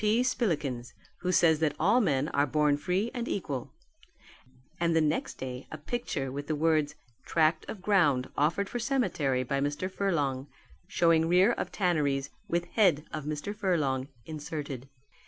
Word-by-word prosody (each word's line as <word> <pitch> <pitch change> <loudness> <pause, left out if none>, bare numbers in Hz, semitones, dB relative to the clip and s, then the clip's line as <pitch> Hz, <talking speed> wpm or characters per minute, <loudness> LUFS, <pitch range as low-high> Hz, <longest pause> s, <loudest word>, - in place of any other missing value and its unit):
P. 220 +3 +3
Spillikins, 150 - -1 0.3
who 180 - -1
says 160 -4 +4
that 160 -2 +1
all 210 +10 +4
men 145 - +1
are 145 +1 +1
born 150 +1 +3
free 180 +9 -1
and 240 -2 -3
equal"; 140 -10 -3 1.1
and 170 -1 +2
the - - +5
next 155 0 0
day 125 0 -6
a 155 - -5
picture 150 - -3
with 145 +2 -5
the 155 - 0
words, 155 -1 +1 0.3
"Tract 160 -1 +2
of 195 -4 -7
ground 150 -12 +3
offered 170 +7 +1
for 245 - -4
cemetery 165 - 0
by 140 +2 -1
Mr. 145 +7 -2
Furlong, 145 -9 -1 0.4
showing 165 -1 +3
rear 180 +6 +5
of - - -3
tanneries, 150 -8 0 0.2
with 175 -2 0
head 175 -9 +3
of 155 -2 -4
Mr. 155 +7 -4
Furlong 150 -10 0 0.2
inserted." 145 -4 -6
155 Hz, 155 wpm, -29 LUFS, 145-185 Hz, 1.1 s, the